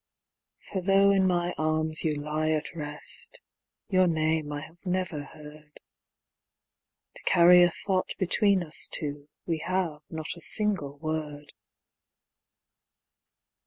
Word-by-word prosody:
For 190 - -2
though 195 +1 +4
in 190 -1 +3
my 175 -1 0
arms 155 0 0
you 155 -2 0
lie 150 +2 -2
at 155 -1 -2
rest, 150 -2 -5 0.5
your 185 -2 +3
name 160 -2 0
I 145 0 -4
have 165 +3 -14
never 180 -5 -2
heard, 150 0 -14 1.4
To - - -14
carry 175 +1 +7
a 175 - +6
thought 185 +2 -2
between 190 +1 +2
us 160 -1 +1
two, 145 -1 -5 0.2
we 165 -2 -2
have 170 -3 -2
not 160 0 -5
a 170 - -13
single 160 -4 +3
word. 150 -1 -5
160 Hz, 125 wpm, -27 LUFS, 150-180 Hz, 1.4 s, carry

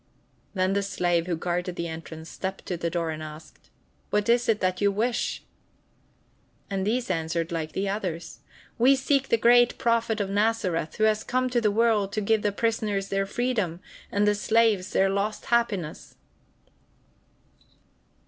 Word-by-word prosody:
Then 185 0 +1
the 200 - +1
slave 175 -3 0
who 175 - 0
guarded 175 +2 -2
the 170 0 -3
entrance 160 0 -8
stepped 190 +3 -5
to 180 - -2
the 170 0 -2
door 165 -1 -1
and 155 0 -6
asked: 155 0 -11 0.4
"What 210 +2 0
is 240 0 +3
it 215 -2 +3
that 185 0 -1
you 200 0 +4
wish?" 230 +4 -1 1.3
And 195 0 -1
these 240 -1 0
answered 165 0 -2
like 160 -2 -3
the 195 +1 -1
others: 180 -5 -4 0.4
"We 260 +4 +6
seek 270 0 +1
the 230 - +4
great 240 +1 +5
Prophet 230 -1 +1
of 200 - 0
Nazareth, 205 -6 0
who 215 - -1
has 215 0 +3
come 255 0 0
to 240 -1 +2
the 215 - +3
world 210 -2 +2
to 215 - 0
give 215 +1 +2
the 205 - +1
prisoners 210 -2 -1
their 195 0 0
freedom 210 -8 -1 0.3
and 205 +1 +2
the 210 - +4
slaves 215 -2 +2
their 195 - +3
lost 200 +2 -2
happiness." 205 -10 -1
200 Hz, 165 wpm, -26 LUFS, 175-225 Hz, 1.3 s, We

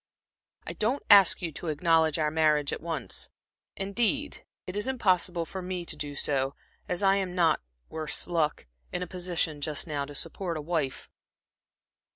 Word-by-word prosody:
I - - -3
don't 240 +6 0
ask 195 -2 +8
you 165 - -1
to 165 - -7
acknowledge 160 0 +3
our 155 -1 +1
marriage 150 -2 +3
at - - -4
once 165 -2 -2 0.5
indeed 235 +9 0 0.2
it 185 - -6
is 205 +4 0
impossible 185 -8 +1
for 190 +3 -6
me 180 -1 -4
to - - -5
do 145 -1 -5
so, 135 -1 0 0.3
as 180 +2 -1
I 195 0 +5
am 185 -2 -2
not 165 -3 +3 0.3
worse 155 -1 -3
luck 160 - 0 0.3
in 180 - -2
a - - -6
position 175 -4 -2
just 150 0 -1
now 145 -4 -2
to 145 +1 -10
support 170 +2 -3
a - - -3
wife." 150 -4 -2
170 Hz, 170 wpm, -28 LUFS, 150-185 Hz, 0.5 s, ask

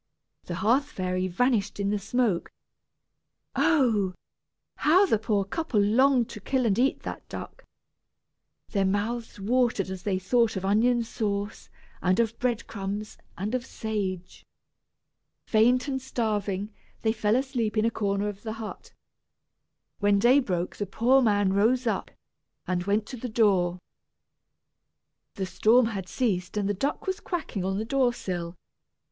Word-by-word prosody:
The 175 - -4
hearth 235 +10 +2
fairy 185 -7 -2
vanished 205 +1 0
in 200 0 0
the 210 - 0
smoke. 215 -3 0 1.0
Oh! 225 - +2 0.6
how 360 +7 +5
the 225 - +2
poor 210 -2 +1
couple 255 +1 -1
longed 245 +4 +4
to 210 - -7
kill 255 +5 0
and 210 -1 +2
eat 265 +2 +2
that - - -7
duck. - - -8 1.1
Their 200 -2 +1
mouths 210 +4 -2
watered 225 -3 +1
as 190 -1 -6
they 190 0 0
thought 230 +4 +2
of 190 0 -3
onion 235 +4 +3
sauce, 205 -2 -3 0.3
and 185 +3 +2
of 225 -1 +1
breadcrumbs, 215 -4 -3 0.2
and 200 +6 -3
of 255 -1 0
sage. 200 -7 -4 1.0
Faint 245 +4 +3
and 265 -1 -2
starving, 210 -5 -2 0.3
they 220 -1 +2
fell 215 -1 +1
asleep 245 -5 -1
in 215 - +3
a 230 - +2
corner 200 -1 -1
of 205 -1 -6
the 220 -1 -4
hut. 225 -1 -8 1.1
When 205 -1 +3
day 245 +7 +5
broke 180 -8 -2
the 205 - -3
poor 250 +7 +3
man 205 -4 +2
rose 235 +6 +2
up, 225 - -1 0.6
and 180 -1 -1
went 205 +2 +1
to 255 - -6
the 245 +2 -5
door. 190 -6 +2 1.6
The 195 - -2
storm 220 +7 +4
had 195 -5 -4
ceased 200 -6 -1
and 200 -1 0
the 205 - +1
duck 275 +10 -2
was 380 +1 -2
quacking 325 - -4
on 190 +1 -1
the 215 - -2
door 255 0 +2
sill. 175 -5 -4
215 Hz, 150 wpm, -27 LUFS, 195-245 Hz, 1.6 s, how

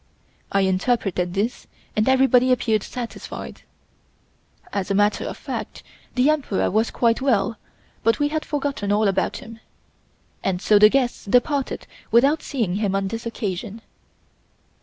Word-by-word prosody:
I 195 - +2
interpreted 190 -2 0
this, 215 +5 -2 0.3
and 215 +4 +2
everybody 260 -1 +4
appeared 225 -4 +2
satisfied. 240 +3 -7 1.1
As 200 -1 -2
a 200 - +1
matter 205 +1 +2
of - - -5
fact - - -6 0.3
the 250 +2 +3
Emperor 295 -10 +1
was 220 +3 +2
quite 230 +1 +1
well, 230 -4 +1 0.4
but 230 +1 +2
we 290 0 +1
had 310 0 -2
forgotten 280 -8 -2
all 210 +1 +3
about 195 -1 0
him. 230 -3 -11 0.8
And 185 -2 0
so 210 +1 +4
the 210 0 +8
guests 255 0 0
departed 255 +6 +1 0.2
without 275 +7 +4
seeing 220 -10 -2
him 205 -2 0
on 195 0 -1
this 230 +2 -5
occasion. 210 -1 -5
225 Hz, 140 wpm, -22 LUFS, 200-255 Hz, 1.1 s, the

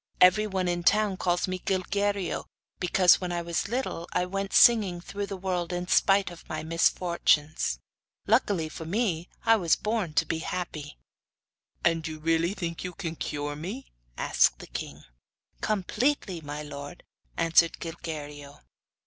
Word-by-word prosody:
'Everyone 190 0 +4
in 175 0 0
the 170 - -2
town 210 -2 +3
calls 175 -1 0
me 185 0 -3
Gilguerillo[FN#1], 195 0 -1 0.3
because, 180 0 +4
when 180 -1 -3
I 175 -1 -2
was 170 +2 -2
little, 230 -7 -3
I 180 - +1
went 195 +1 -3
singing 205 -7 +5
through 200 +3 -5
the 195 - -5
world 180 -2 -2
in 175 0 -3
spite 195 0 +3
of 175 - -13
my - - -4
misfortunes. 160 - +1 0.5
Luckily 200 -7 +2
for 155 - -8
me 180 -2 -1 0.2
I 225 0 +6
was 170 -5 +3
born 210 -8 -2
to 165 - +3
be 160 +1 -2
happy.' 160 -4 -5 0.9
'And 165 -1 +2
you 155 -1 -6
really 165 +4 +1
think 170 -4 -4
you 180 -1 -5
can 165 -3 -4
cure 145 -1 -3
me?' 195 - -7 0.3
asked - - +3
the - - -10
king. - - -7 0.6
'Completely, 210 - 0
my 150 0 -6
lord,' 145 +3 -8 0.3
answered 165 0 +4
Gilguerillo. 150 -4 -7
175 Hz, 150 wpm, -27 LUFS, 165-195 Hz, 0.9 s, I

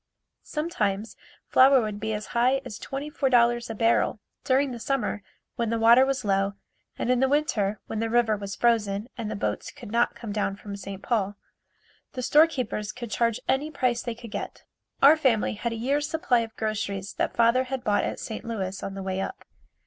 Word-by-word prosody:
Sometimes 220 - -2 0.3
flour 265 +1 +6
would 215 -3 -3
be 220 +1 -2
as 210 0 -3
high 250 +3 +3
as 210 - -7
$24 260 -5 +1
a 225 - -4
barrel. 230 0 +2 0.2
During 270 +1 +2
the 240 - -6
summer 245 -3 -1 0.4
when 235 -2 0
the 230 - 0
water 235 +4 +6
was 270 -4 -1
low 195 0 +1 0.4
and 250 - 0
in 250 - +3
the 265 +1 +3
winter 225 -9 +1
when 220 - -4
the 225 0 -1
river 230 -2 +3
was 200 -2 -6
frozen 215 -2 +1
and 230 -4 -4
the 215 - -3
boats 200 - -2
could 245 -7 -11
not 235 +1 +2
come 225 -3 -7
down 205 -1 -1
from 200 0 -8
St. 195 0 -8
Paul, 205 -4 0 0.8
the 255 - -4
storekeepers 255 -8 +2
could 240 -2 -8
charge 230 0 +1
any 275 +4 +1
price 255 -5 0
they 235 -2 -4
could 230 -1 -11
get. - - -6 0.4
Our 285 +3 +9
family 255 -8 +2
had 235 +3 -3
a - - -3
year's 280 +6 0
supply 275 -6 +2
of 225 -1 -5
groceries 200 -3 -3
that - - 0
father 235 +3 +4
had 260 -1 -4
bought 205 -3 +2
at - - -3
St. 220 - -6
Louis 195 -5 -4
on 195 - -5
the 195 - -5
way 190 0 -2
up. 385 - -6
230 Hz, 195 wpm, -26 LUFS, 210-260 Hz, 0.8 s, Our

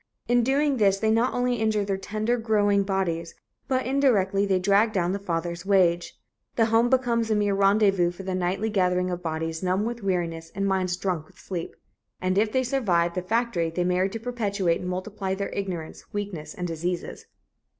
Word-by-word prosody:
In 245 0 +4
doing 275 +2 +2
this, 200 -3 +3
they 220 +2 +1
not 230 +3 +2
only 245 0 0
injure 215 -2 +1
their 195 -1 -1
tender 215 +4 -1
growing 205 -3 +2
bodies, 185 -4 -2 0.3
but 260 -1 0
indirectly, 210 -8 +2
they 190 -1 +3
drag 200 +4 +3
down 180 -3 +1
the 200 - -2
father's 170 -2 -3
wage... 180 -3 +2 0.4
The 225 - +4
home 230 +2 +4
becomes 240 -3 +1
a 215 - +2
mere 205 -1 +1
rendezvous 195 -2 +3
for 175 +2 -9
the 190 0 -3
nightly 185 +4 -1
gathering 180 -2 +1
of 175 0 -4
bodies 160 0 -3
numb 185 +3 0
with 235 0 -4
weariness 170 -4 -2
and 195 +1 -1
minds 185 -2 0
drunk 180 -5 -2
with 185 - -23
sleep." 175 -4 -6 0.4
And 185 0 0
if 215 0 +1
they 260 +2 +1
survive 185 -10 +1
the 180 - -2
factory, 205 -4 0
they 175 +2 -1
marry 180 +2 +1
to 225 +3 -5
perpetuate 205 -7 -1
and 180 - -4
multiply 190 +1 -3
their 200 +1 -3
ignorance, 180 -5 -5
weakness 200 -7 -5
and 180 - -3
diseases. 170 +2 -4
195 Hz, 190 wpm, -25 LUFS, 180-220 Hz, 0.4 s, In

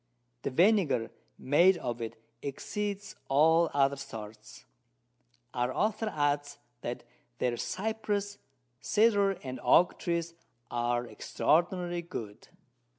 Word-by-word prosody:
The - - -2
Vinegar 170 - +3 0.3
made 175 +7 +4
of 120 -6 -4
it 115 0 -5 0.2
exceeds 200 +8 -4
all 160 +4 +5
other 140 0 +3
sorts. 110 -5 -9 0.9
Our 125 +1 0
Author 215 - 0
adds, 145 -1 0 0.2
that 120 - -5 0.3
their 120 -1 0
Cypress, 205 - -2 0.4
Cedar 205 - +3
and 130 -1 -5
Oak 175 - +4
Trees 170 -1 -2 0.4
are 120 0 0
extraordinary 175 +7 0
good. 115 - -8
155 Hz, 100 wpm, -30 LUFS, 125-195 Hz, 0.9 s, all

